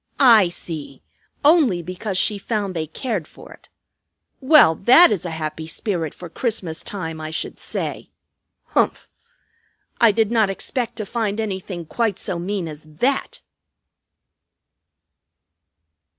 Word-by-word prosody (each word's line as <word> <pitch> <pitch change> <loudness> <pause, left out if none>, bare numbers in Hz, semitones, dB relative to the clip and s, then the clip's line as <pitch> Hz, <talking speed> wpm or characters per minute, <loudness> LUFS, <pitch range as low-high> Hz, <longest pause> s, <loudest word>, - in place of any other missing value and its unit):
I 230 -9 +7
see! 155 -6 -6 0.4
Only 285 - +4
because 185 +3 -4
she 205 +1 +1
found 205 -2 -2
they 160 -1 -2
cared 200 - -4
for - - -14
it. - - -20 0.7
Well, 270 - +6
that 255 - +6
is 190 -4 -1
a - - -2
happy 160 0 -5
spirit 165 -3 -3
for 180 - -9
Christmas 180 -4 -3
time, 165 -6 -5
I 155 - -5
should 155 - -5
say! - - -4 0.6
Humph! - - 0 0.9
I 230 -2 +6
did 220 +1 +1
not 220 -4 +3
expect 235 +4 -3
to 215 -2 -4
find 220 -1 -2
anything 190 -5 -4
quite 220 +3 -1
so 175 - -3
mean 185 0 -3
as 150 -1 -9
_that! 165 - -2
195 Hz, 130 wpm, -21 LUFS, 165-230 Hz, 0.9 s, I